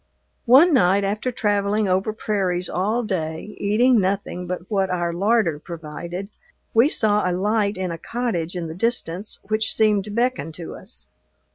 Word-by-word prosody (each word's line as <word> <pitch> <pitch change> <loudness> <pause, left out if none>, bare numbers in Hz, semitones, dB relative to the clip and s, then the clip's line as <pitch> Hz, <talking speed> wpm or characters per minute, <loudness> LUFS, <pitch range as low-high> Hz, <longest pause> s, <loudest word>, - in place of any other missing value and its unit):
One 290 +8 +7
night, 200 -5 +4
after 210 +6 -1
traveling 205 -1 0
over 190 +3 +1
prairies 190 -5 -1
all 215 +7 0
day, 165 -1 -4
eating 230 +4 +3
nothing 190 -2 -2
but 180 -1 -3
what 195 -3 0
our 175 -2 -1
larder 195 -4 +1
provided, 170 +4 -7 0.4
we 230 +6 +5
saw 210 - +2
a - - 0
light 205 +2 0
in 185 -2 -2
a 165 - -6
cottage 200 -9 -3
in 175 -2 -3
the 160 - -6
distance 195 -1 -2
which 215 +2 0
seemed 210 -2 +3
to - - -8
beckon 240 -4 -1
to 165 +1 -8
us. 210 +7 -9
200 Hz, 160 wpm, -22 LUFS, 180-220 Hz, 0.4 s, One